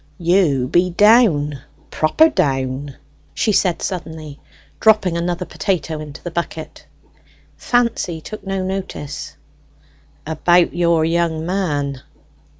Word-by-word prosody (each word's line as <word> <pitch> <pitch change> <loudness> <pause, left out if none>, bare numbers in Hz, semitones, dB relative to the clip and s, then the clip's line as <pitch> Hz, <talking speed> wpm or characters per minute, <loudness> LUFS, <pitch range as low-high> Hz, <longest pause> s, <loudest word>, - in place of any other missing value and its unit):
"You 170 -8 +2
be 175 +6 +2
down 180 - +4 0.3
proper 235 - +4
down," 135 - -1 0.4
she 220 - +1
said 185 -4 +1
suddenly, 160 -5 -6 0.4
dropping 215 -6 +3
another 175 +1 -2
potato 165 -6 -2
into 150 0 -9
the 175 - -5
bucket. 165 -2 -5 0.7
Fancy 235 -9 0
took 215 +7 -9
no 195 -1 -2
notice. 185 -6 -5 0.9
"About 175 +3 +2
your 170 -2 +2
young 165 -1 0
man." 145 -8 -2
170 Hz, 105 wpm, -19 LUFS, 150-190 Hz, 0.9 s, down